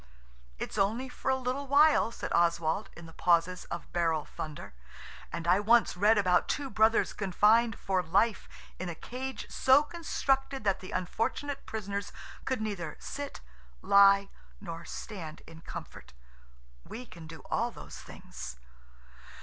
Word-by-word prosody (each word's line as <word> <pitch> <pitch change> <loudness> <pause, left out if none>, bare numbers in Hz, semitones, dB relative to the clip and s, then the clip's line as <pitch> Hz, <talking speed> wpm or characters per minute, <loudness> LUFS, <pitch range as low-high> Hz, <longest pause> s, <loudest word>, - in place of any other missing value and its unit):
"It's 210 - -4
only 225 +7 +1
for 250 - -4
a 265 - +4
little 260 +2 -3
while," 290 -2 +5
said - - -5
Oswald 170 +3 +1
in 170 - -10
the 165 - -12
pauses 175 +1 +2
of 170 - -5
the - - -24
barrel 165 -3 0
thunder, 155 - -7 0.6
"and 170 0 -4
I 180 +3 +5
once 225 +1 +4
read 210 +4 +4
about 185 -3 +3
two 280 -2 -2
brothers 220 +1 +3
confined 215 +4 +3
for 190 -2 0
life 195 +6 +1 0.3
in 185 - -3
a 170 - -5
cage 260 +8 -6
so 265 +3 +5
constructed 275 -5 -1
that 195 -2 +1
the 185 - -9
unfortunate 225 +10 -2
prisoners 200 -2 -4 0.3
could 260 -4 -1
neither 175 -7 -4
sit, 285 0 -6 0.4
lie, 200 0 +6 0.3
nor 170 -4 -7
stand 165 -7 -7
in 160 0 -13
comfort. - - -9 0.7
We 250 +2 -8
can 170 -7 -12
do 160 -1 -10
all - - +1
those - - -10
things." 60 - -9
200 Hz, 150 wpm, -30 LUFS, 175-250 Hz, 0.7 s, lie